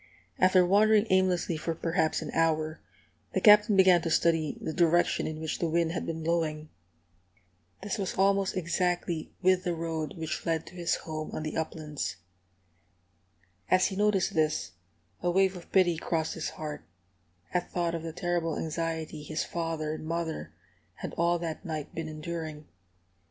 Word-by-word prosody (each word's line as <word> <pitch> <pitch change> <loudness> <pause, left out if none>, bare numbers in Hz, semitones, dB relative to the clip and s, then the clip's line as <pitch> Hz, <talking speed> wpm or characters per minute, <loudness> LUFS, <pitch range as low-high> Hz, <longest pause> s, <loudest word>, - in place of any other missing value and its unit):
After 185 -1 +5
wandering 210 +3 +5
aimlessly 185 -3 +2
for 165 +1 -3
perhaps 165 -1 0
an - - -6
hour, 160 -1 +1 0.5
the - - +3
Captain 210 -1 +7
began 185 -2 +6
to 165 - -2
study 165 -2 +2
the 160 - -4
direction 175 +1 +3
in 155 0 -5
which 160 -1 -3
the 170 - 0
wind 165 0 +1
had 175 - -3
been 160 -1 -4
blowing. 155 -2 -1 1.1
This 205 +2 -3
was 195 - -2
almost 195 0 +2
exactly 175 -2 -1
with 185 0 +4
the 175 -2 -1
road 160 -1 -3
which 160 -1 -3
led 165 -1 -1
to - - -12
his 175 -2 0
home 155 -1 -5
on 155 - -3
the 155 - -4
uplands. 150 - -3 1.5
As 185 0 +5
he 190 - -1
noticed 205 -2 +2
this, 155 -1 0 0.5
a 175 - +1
wave 190 +1 +3
of 175 - -11
pity 175 -3 +4
crossed 160 -1 -1
his 160 - -3
heart, 150 - -6 0.7
at 180 0 -1
thought 170 -1 0
of 165 - -3
the 165 0 -5
terrible 170 -1 -1
anxiety 160 -1 -3
his 155 +1 -3
father 165 -2 -3
and 155 - -7
mother 165 -1 -3 0.4
had - - -6
all 170 +1 +2
that 165 -2 -5
night 155 -3 -5
been 165 -1 -4
enduring. 155 -1 -6
165 Hz, 160 wpm, -29 LUFS, 155-180 Hz, 1.5 s, Captain